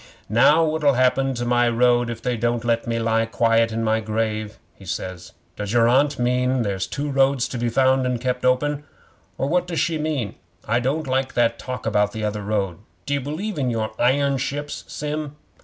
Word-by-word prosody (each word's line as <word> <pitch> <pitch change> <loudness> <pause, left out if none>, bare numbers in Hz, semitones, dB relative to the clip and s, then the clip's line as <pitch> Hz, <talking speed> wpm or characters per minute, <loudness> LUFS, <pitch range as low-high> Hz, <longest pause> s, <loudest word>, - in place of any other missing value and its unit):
'"Now 150 +9 +5
what'll 155 -3 +2
happen 130 +1 +2
to 120 0 -3
my 120 0 +3
road 120 0 +3
if 115 -1 -6
they 125 -1 0
don't 120 +1 -1
let 115 0 0
me 115 0 0
lie 115 0 +1
quiet 115 0 +2
in 115 +1 -2
my 110 0 +2
grave?" 110 0 -2 0.2
he - - -17
says. 90 0 -6 0.2
"Does 105 +1 -4
your 115 -1 +4
Aunt 140 +4 +3
mean 125 +1 +1
there's 95 -3 -2
two 145 +1 -3
roads 135 -2 +2
to 125 - -4
be 120 0 0
found 130 +1 +3
and 125 -1 -1
kept 125 0 -2
open 145 +3 +1 0.5
or 135 - -1
what 180 +3 +1
does 170 -4 -2
she 160 +2 0
mean? 150 -9 -2 0.3
I 115 +3 +2
don't 140 +6 -1
like 130 0 -1
that 115 -1 +2
talk 125 -2 -6
about 105 -2 +1
t'other 105 -1 -3
road. 100 -4 -2 0.3
D'you 140 0 -1
believe 155 +7 -4
in 130 -3 0
your 110 -2 -2
iron 135 +2 +2
ships, 145 +3 -4
Sim?" 150 0 -4
125 Hz, 195 wpm, -22 LUFS, 115-140 Hz, 0.5 s, Now